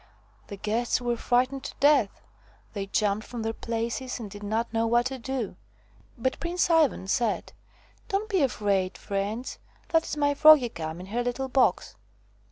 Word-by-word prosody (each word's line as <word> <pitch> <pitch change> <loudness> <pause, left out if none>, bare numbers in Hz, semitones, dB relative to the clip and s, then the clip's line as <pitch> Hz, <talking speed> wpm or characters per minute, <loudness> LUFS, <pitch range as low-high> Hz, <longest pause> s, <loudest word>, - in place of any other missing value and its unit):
The 200 - -7
guests 225 +5 0
were 240 -1 -1
frightened 255 +3 0
to - - -6
death; 280 -8 +3 0.5
they 200 -2 -4
jumped 205 +1 0
from 235 -3 -5
their 225 0 -1
places 235 +3 -3
and 210 -4 -7
did 205 - -9
not 220 +3 -2
know 225 0 +1
what 240 +1 +3
to 260 0 -3
do. 250 -3 -4 0.6
But 260 +2 -1
Prince 345 +1 0
Ivan 310 - +3
said: 230 +1 -1 0.6
"Don't 400 +2 -1
be 390 -6 +1
afraid, 200 -8 0
friends! 205 +5 -4 0.3
That 325 -1 +2
is - - -4
my 285 -1 +2
Froggie 300 -4 +7
come 160 -2 -6
in - - -8
her 225 +5 -2
little 255 +2 -2
box." 260 0 +1
240 Hz, 170 wpm, -27 LUFS, 210-270 Hz, 0.6 s, Froggie